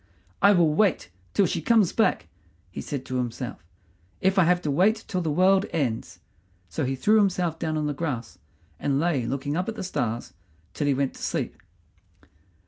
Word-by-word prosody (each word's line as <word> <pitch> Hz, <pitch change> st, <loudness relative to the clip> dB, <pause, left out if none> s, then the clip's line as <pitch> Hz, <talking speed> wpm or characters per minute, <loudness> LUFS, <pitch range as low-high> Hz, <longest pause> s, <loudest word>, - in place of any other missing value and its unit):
"I 200 Hz, -, +7 dB
will 170 Hz, -5 st, +4 dB
wait 185 Hz, -, +1 dB, 0.2 s
till 200 Hz, -, +4 dB
she 165 Hz, -1 st, -1 dB
comes 210 Hz, +1 st, +3 dB
back," 225 Hz, -, +1 dB, 0.4 s
he -, -, -6 dB
said 140 Hz, -3 st, -5 dB
to 130 Hz, -, -3 dB
himself, 120 Hz, -4 st, -4 dB, 0.6 s
"if 190 Hz, +1 st, +2 dB
I 180 Hz, -, +5 dB
have 175 Hz, +1 st, +3 dB
to 150 Hz, -, 0 dB
wait 210 Hz, +9 st, +2 dB
till 185 Hz, -3 st, -1 dB
the 165 Hz, -, -1 dB
world 190 Hz, +5 st, +3 dB
ends." 130 Hz, -8 st, -2 dB, 0.5 s
So 80 Hz, -, -2 dB
he 135 Hz, +1 st, -1 dB
threw 210 Hz, +11 st, +3 dB
himself 180 Hz, -5 st, +1 dB
down 155 Hz, -1 st, -1 dB
on 150 Hz, -, -1 dB
the 150 Hz, -, -1 dB
grass 130 Hz, -7 st, -4 dB, 0.4 s
and 140 Hz, -1 st, 0 dB
lay 145 Hz, -7 st, 0 dB
looking 140 Hz, +3 st, -2 dB
up 180 Hz, +4 st, -1 dB
at 225 Hz, -, -5 dB
the -, -, -5 dB
stars 120 Hz, -10 st, -3 dB, 0.4 s
till 145 Hz, -, -2 dB
he 140 Hz, -, +3 dB
went 135 Hz, 0 st, 0 dB
to -, -, -13 dB
sleep. -, -, -2 dB
160 Hz, 190 wpm, -25 LUFS, 135-185 Hz, 0.6 s, I